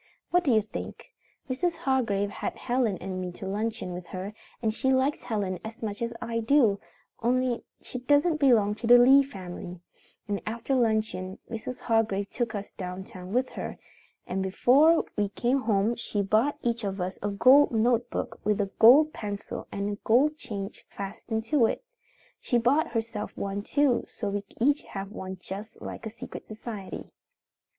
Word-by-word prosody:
What 355 0 +4
do 280 - +2
you 215 -2 +4
think? 210 - -7 0.4
Mrs. 330 +7 0
Hargrave 240 -10 0
had - - -4
Helen 240 -6 0
and 185 +1 -5
me 180 -1 -4
to 190 - -8
luncheon 205 -1 -2
with 175 -1 -7
her, 190 +4 -6 0.3
and 220 -2 0
she 265 +3 +1
likes 265 +3 +2
Helen 205 -7 -2
as 220 +1 -8
much 205 -1 -4
as 235 0 -1
I 230 0 -2
do, 230 -4 +4 0.4
only 250 +1 +1 0.2
she 250 - -6
doesn't 290 +5 +3
belong 230 -8 +4
to 225 - -4
the 245 +1 +9
Lee 265 +3 +8
family, 180 -8 -7 0.5
and 205 -1 -2
after 235 +4 -2
luncheon 220 -6 0
Mrs. 235 +2 -5
Hargrave 215 -4 +1
took 235 -2 -2
us 205 0 -5
down 185 0 -6
town 185 -1 -10
with 250 +4 +1
her, - - -6 0.5
and 190 +1 -2
before 270 - +4
we 205 -1 0
came 245 +7 0
home 220 -1 +2
she 210 -3 -2
bought 220 +9 +2
each 235 -1 0
of 195 -1 -3
us 180 +1 -3
a 205 - -1
gold 255 +8 +6
notebook 235 +1 0
with 210 0 +1
a 200 -1 -1
gold 285 +7 +8
pencil 205 -1 -5
on 200 0 -2
a 205 - -2
gold 265 +9 +3
chain 210 -8 -5 0.2
fastened 215 +3 -4
to 240 -1 +3
it. - - -3 0.6
She 245 - +1
bought 280 +8 +2
herself 225 -2 -3
one 200 0 -2
too 275 +2 +2
so 205 - -4
we 200 0 -2 0.2
each 285 +5 +3
have 195 0 -7
one 190 -3 -6
just 205 +5 -8
like 225 - -6
a - - -3
secret 225 - -9
society. 215 -2 -7
225 Hz, 175 wpm, -28 LUFS, 200-250 Hz, 0.6 s, the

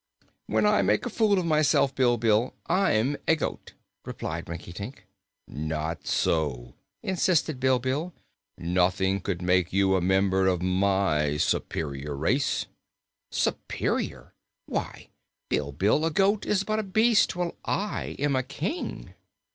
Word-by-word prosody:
"When 110 0 +2
I 100 -1 +4
make 105 +2 +1
a - - -3
fool 215 -3 +3
of 180 - 0
myself, 150 -3 +3
Bilbil, 120 -3 +2
I'm 145 - +2
a 160 - +5
goat," 155 - -5 0.3
replied 80 +1 -5
Rinkitink. 90 +6 -7 0.4
"Not 80 0 -4
so," 65 -7 0 0.3
insisted 170 -6 +1
Bilbil. 130 +6 +1 0.5
"Nothing 95 +3 +1
could 90 -2 -3
make 90 -1 +2
you 95 0 +3
a 95 - +1
member 95 +1 +2
of 90 -2 +1
my 95 -6 +1
superior 70 -1 -2
race." 120 - 0 0.6
"Superior? - - -2 0.3
Why, - - -5 0.4
Bilbil, 85 - +1
a 165 - +2
goat 195 +5 +1
is 200 -2 +2
but 215 +1 -1
a - - -1
beast, 215 +2 +3
while 175 -1 -2
I 205 +1 -2
am 145 -1 +1
a 130 - +2
King!" 180 - -5
105 Hz, 125 wpm, -27 LUFS, -, 0.6 s, a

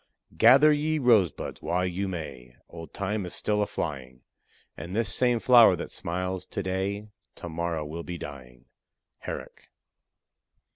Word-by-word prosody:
Gather 135 - +7
ye 155 +2 0
rosebuds 115 - +2
while 90 +1 0
you 90 +2 -2
may, 70 -9 -7
Old 80 -3 -10
Time 100 +1 -3
is - - -5
still 105 0 0
a 105 - 0
flying; 65 -4 -5 0.5
And 85 +3 -7
this 110 -3 +1
same 125 -2 +2
flower 115 -6 +7
that - - -7
smiles 90 +1 -4
to 100 - -4
day 95 +3 -3 0.3
To - - -8
morrow 85 -1 -3
will 80 +3 -6
be 85 +1 -6
dying. 65 -5 -10 0.6
HERRICK. - - -8
90 Hz, 145 wpm, -27 LUFS, 80-105 Hz, 0.6 s, Gather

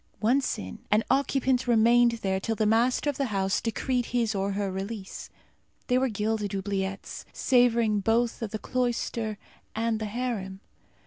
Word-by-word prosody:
Once 250 +5 +1
in, 95 -1 -7
an 215 +2 +3
occupant 265 -2 +1
remained 235 +1 +5
there 190 -1 +1
till 225 +3 -2
the 215 - +1
master 235 +6 +2
of 285 -2 0
the 275 - 0
house 195 -3 0
decreed 245 +2 -1
his 235 -2 0
or 195 0 -1
her 200 -1 -1
release. 195 +1 -6 0.6
They 250 +1 +2
were 265 0 +1
gilded 210 -1 -2
oubliettes, 195 0 -3
savouring 235 -4 +3
both 225 +4 +1
of 225 - -2
the 215 - -3
cloister 235 -3 -2 0.4
and 225 0 0
the 220 - -3
harem. 210 -4 -4
225 Hz, 155 wpm, -27 LUFS, 200-245 Hz, 0.6 s, remained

